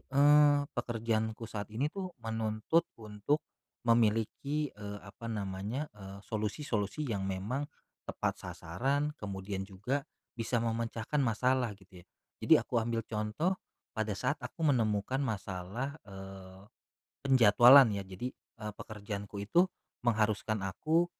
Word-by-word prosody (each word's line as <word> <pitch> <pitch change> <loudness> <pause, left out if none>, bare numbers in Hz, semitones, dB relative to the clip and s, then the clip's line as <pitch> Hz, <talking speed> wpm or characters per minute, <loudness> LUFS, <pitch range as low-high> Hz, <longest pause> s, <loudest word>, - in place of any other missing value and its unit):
eee, 145 +1 +6
pekerjaanku 115 -2 -1
saat 105 -2 -5
ini 125 +7 0
tuh 185 -3 -5
menuntut 110 +8 0
untuk 110 +7 -1 0.4
memiliki, 115 +6 +2
eee, 105 0 -7
apa 110 +4 -9
namanya, 105 +6 -3
eee, 100 -1 -10
solusi-solusi 110 +3 -2
yang 100 -5 -2
memang 110 +10 -2 0.4
tepat - - -1
sasaran 140 - -1
kemudian 95 -1 -4
juga 105 +9 -2 0.3
bisa 115 0 0
memecahkan 115 +4 -1
masalah 125 0 +2
gitu 95 -2 -15
ya. - - -27 0.4
Jadi, - - +7
aku 120 - 0
ambil 115 0 -1
contoh 110 - 0 0.4
pada 110 -2 -2
saat 145 +9 -1
aku 165 -3 -5
menemukan 110 +2 +1
masalah, 105 +3 -3
eee, 95 -1 -10 0.6
penjadwalan 125 -1 +8
ya. 100 - -2
Jadi, 110 +7 -5
eee, 105 -2 -9
pekerjaanku 105 -1 -6
itu 175 - +4 0.3
mengharuskan 110 -2 +1
aku, 160 - +2
110 Hz, 120 wpm, -32 LUFS, 100-130 Hz, 0.6 s, penjadwalan